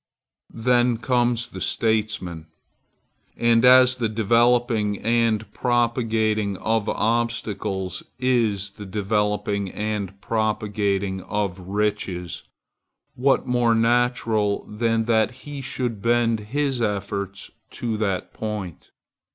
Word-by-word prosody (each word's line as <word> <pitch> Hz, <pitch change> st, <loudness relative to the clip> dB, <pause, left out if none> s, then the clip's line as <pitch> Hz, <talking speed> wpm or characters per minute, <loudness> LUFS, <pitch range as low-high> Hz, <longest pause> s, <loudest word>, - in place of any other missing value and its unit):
Then 120 Hz, -1 st, +3 dB
comes 120 Hz, 0 st, 0 dB
the -, -, -8 dB
statesman; 105 Hz, -7 st, 0 dB, 0.9 s
and 115 Hz, 0 st, +3 dB
as 130 Hz, 0 st, +7 dB
the 115 Hz, -3 st, 0 dB
developing 115 Hz, -1 st, +2 dB
and 110 Hz, -2 st, 0 dB
propagating 115 Hz, -4 st, 0 dB
of 110 Hz, +1 st, 0 dB
obstacles 105 Hz, -5 st, -1 dB, 0.2 s
is 115 Hz, -6 st, +1 dB
the 100 Hz, 0 st, -10 dB
developing 105 Hz, 0 st, -1 dB
and 105 Hz, -1 st, -4 dB
propagating 100 Hz, -3 st, -1 dB
of 100 Hz, -2 st, -2 dB
riches, 95 Hz, -3 st, -2 dB, 0.7 s
what 135 Hz, +2 st, +2 dB
more 120 Hz, -2 st, +2 dB
natural 115 Hz, -3 st, +1 dB
than 115 Hz, +1 st, 0 dB
that 110 Hz, -1 st, +3 dB, 0.2 s
he 145 Hz, -1 st, -6 dB
should 125 Hz, -5 st, -3 dB
bend 115 Hz, -1 st, +2 dB
his 140 Hz, -1 st, 0 dB
efforts 100 Hz, -2 st, -3 dB, 0.2 s
to 115 Hz, -2 st, -3 dB
that 100 Hz, -4 st, -2 dB
point? 105 Hz, -6 st, -6 dB
110 Hz, 100 wpm, -23 LUFS, 100-120 Hz, 0.9 s, as